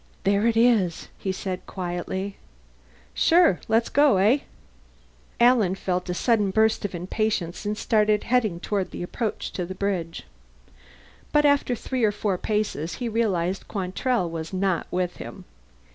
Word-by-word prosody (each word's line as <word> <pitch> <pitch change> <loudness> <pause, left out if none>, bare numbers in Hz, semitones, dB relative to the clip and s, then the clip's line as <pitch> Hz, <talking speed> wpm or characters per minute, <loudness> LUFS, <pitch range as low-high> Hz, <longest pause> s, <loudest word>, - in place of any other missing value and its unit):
"There 200 +3 +2
it 225 -1 +1
is," 225 -8 +2
he 190 - -2
said 185 -1 -5
quietly. 190 +2 -4 0.8
"Sure. 335 - +4
Let's 225 +1 +2
go, 285 -7 +4
eh?" 215 +9 +4 1.0
Alan 235 -6 +4
felt 180 -2 -2
a 180 - -1
sudden 210 -1 +2
burst 220 +3 +2
of 200 -3 -3
impatience 185 +1 -2
and 210 0 -2
started 210 -2 +2
heading 225 -8 +1
toward 195 0 -2
the - - -6
approach 215 +5 -3
to 180 - -3
the 185 +2 -6
bridge. 185 -4 -2 1.1
But 295 0 +4
after 285 -3 +3
three 255 +2 -3
or 215 - +4
four 200 -3 -2
paces 210 -7 -2
he 240 -2 -3
realized 195 -5 -1
Quantrell 195 +2 -1
was 165 -1 -5
not 190 -2 0
with 180 0 -2
him. 190 -2 -9
200 Hz, 145 wpm, -25 LUFS, 180-225 Hz, 1.1 s, Sure